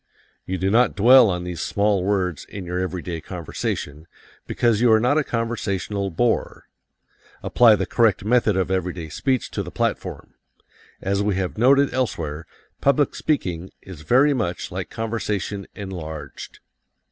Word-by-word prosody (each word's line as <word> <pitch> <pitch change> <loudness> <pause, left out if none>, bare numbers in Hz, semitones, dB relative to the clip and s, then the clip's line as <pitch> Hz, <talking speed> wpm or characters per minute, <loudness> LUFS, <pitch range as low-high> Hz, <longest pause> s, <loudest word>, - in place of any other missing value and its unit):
You 95 - -2
do 95 +2 0
not 120 +2 +3
dwell 120 +3 +7
on 90 -1 -2
these 90 -1 -5
small 100 -2 +1
words 95 -5 -1
in 100 -3 -8
your 90 +1 -3
everyday 90 -2 -4
conversation, 80 -3 -5 0.4
because 115 -2 +1
you 120 -2 +5
are 110 - +6
not 125 +7 +2
a - - +1
conversational 105 -5 -2
bore. 115 +7 -1 0.8
Apply 115 -3 +5
the - - -2
correct 110 -5 +2
method 110 -3 +2
of 95 -1 0
everyday 90 -3 -2
speech 130 - -1
to - - -3
the - - -6
platform. - - -3 0.7
As 100 +1 0
we 100 -1 0
have 95 -1 -2
noted 135 +5 +4
elsewhere, 80 - -3 0.3
public 140 +1 +2
speaking 90 - -2
is 90 -5 -10
very 130 - +4
much 105 -9 -3
like - - -5
conversation 105 -3 -3
enlarged. 80 -7 -8
100 Hz, 145 wpm, -22 LUFS, 90-115 Hz, 0.8 s, dwell